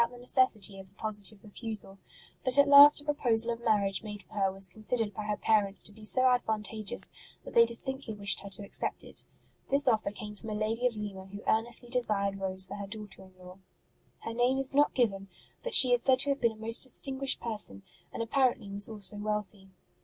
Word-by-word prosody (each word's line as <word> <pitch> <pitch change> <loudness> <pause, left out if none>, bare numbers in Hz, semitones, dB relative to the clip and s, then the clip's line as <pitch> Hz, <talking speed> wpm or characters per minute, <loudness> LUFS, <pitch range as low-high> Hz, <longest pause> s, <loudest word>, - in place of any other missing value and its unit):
ROSE - - +4
OF - - -22
LIMA - - -12
the 245 - -14
necessity 220 -6 +1
of 190 -1 -13
a - - -31
positive 210 -1 -3
refusal; 210 -2 -7 0.4
but 255 0 +5
at 285 0 +5
last 285 +1 +8
a 290 - -11
proposal 235 -6 0
of 230 - -11
marriage 205 -4 0
made 210 -3 -9
for 215 - -22
her 195 -2 0
was 195 0 +2
con 215 - -8
sidered 220 -1 -2
by 210 +1 -7
her 210 -1 -3
parents 205 -2 0
to - - -8
be 215 +1 -17
so 255 +4 +4
advantageous 220 -4 -1 0.3
that - - -10
they 230 0 +5
distinctly 235 0 -3
wished 200 -1 +1
her 200 - -10
to 195 +1 0
accept - - +1
it. - - -7 0.5
This 280 +1 +5
offer 220 -4 +1
came 210 0 -9
from 220 +2 -10
a 215 - -4
lady 225 +3 -1
of 240 - -5
Lima 200 -3 -7
who 200 +2 -11
earnestly 230 +2 0
desired 205 -5 -1
Rose 190 -1 0
for - - -8
her 200 -1 -7
daughter 210 -1 -8
in 185 -1 -18
law. 180 +1 -14 0.6
Her 225 - -6
name 245 +3 +1
is 270 0 -3
not 290 +1 +2
given, 200 -6 -1 0.3
but - - 0
she 255 -2 +9
is 245 - +2
said 260 +1 +3
to 285 - -1
have 280 - -4
been 235 -2 +1
a 220 0 -12
most 230 +1 +4
distinguished 270 0 +1
person, 210 - -5 0.3
and 230 - -4
apparently 240 -4 -1
was 200 +1 +1
also 210 -1 -5
wealthy. 210 -2 -5
215 Hz, 225 wpm, -29 LUFS, 200-245 Hz, 0.6 s, she